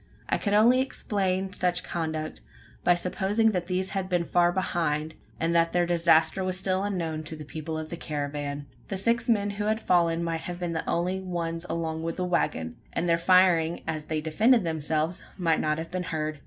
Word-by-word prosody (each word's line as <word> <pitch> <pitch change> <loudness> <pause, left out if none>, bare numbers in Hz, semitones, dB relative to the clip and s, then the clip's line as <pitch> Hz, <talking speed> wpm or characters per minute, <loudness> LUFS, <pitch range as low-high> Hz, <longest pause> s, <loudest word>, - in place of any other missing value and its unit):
I - - +1
could 205 -1 +1
only 240 +5 +6
explain 195 -7 -1
such 180 -2 0
conduct, 155 -2 -4 0.4
by 175 - +5
supposing 195 +5 +1
that 180 -3 -2
these 185 +1 -1
had 195 -2 -2
been 175 -2 +1
far 175 0 +3
behind, 160 -4 -1 0.3
and 165 +1 +1
that 165 0 +3
their 175 0 +3
disaster 170 +1 +3
was 185 0 -1
still 190 0 0
unknown 170 -6 -2
to 160 - -6
the 155 -1 -9
people 160 +2 -5
of 155 0 -6
the 170 - -4
caravan. 145 -2 -4 0.2
The 195 - -3
six 230 +5 +1
men 205 -3 +2
who 205 +1 -3
had 215 +1 +1
fallen 170 -4 +2
might 165 -1 -2
have 175 0 -6
been 175 -2 -2
the 160 - -3
only 180 +2 0
ones 170 -2 -3
along 160 -1 -2
with 165 0 -3
the 180 - -2
waggon; 80 - -1
and 175 - -1
their 170 0 +3
firing, 175 -2 +4
as 155 -2 -3
they 155 -1 -2
defended 215 +9 +3
themselves, 160 +1 -1
might 165 -3 +2
not 155 0 0
have 165 +1 -6
been 185 0 -2
heard? 155 -1 -3
170 Hz, 200 wpm, -27 LUFS, 160-185 Hz, 0.4 s, only